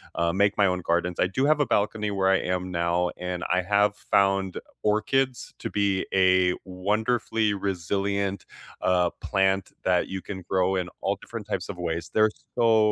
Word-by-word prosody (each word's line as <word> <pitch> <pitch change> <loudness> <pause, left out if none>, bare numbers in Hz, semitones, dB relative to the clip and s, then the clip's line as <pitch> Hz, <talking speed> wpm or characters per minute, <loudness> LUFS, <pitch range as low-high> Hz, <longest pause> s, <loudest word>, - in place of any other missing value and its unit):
uh, 85 0 +1
make 100 +2 +2
my 100 -1 +5
own 90 0 0
gardens, 85 0 0
I - - +3
do 100 +9 -1
have 150 0 +3
a 145 - +3
balcony 105 0 0
where 95 -1 +1
I 95 - +5
am 90 0 -2
now, 85 +1 +1
and 90 -1 -4
I 90 - +1
have 105 +2 +2
found 95 -1 +1 0.2
orchids 120 +5 0
to - - -4
be 100 -2 0
a 95 -1 +4
wonderfully 105 +3 0
resilient, 100 +1 -2 0.4
uh, 90 -1 +2
plant 95 -1 +1
that 90 -1 +2
you 95 0 -5
can 95 +1 -7
grow 95 0 +2
in 90 -1 -2
all 100 +1 0
different 115 -3 -8
types 95 -3 -2
of 100 - -6
ways, 85 -2 -3
they're 110 0 +4 0.3
so 115 -1 +4
95 Hz, 175 wpm, -26 LUFS, 90-105 Hz, 0.4 s, my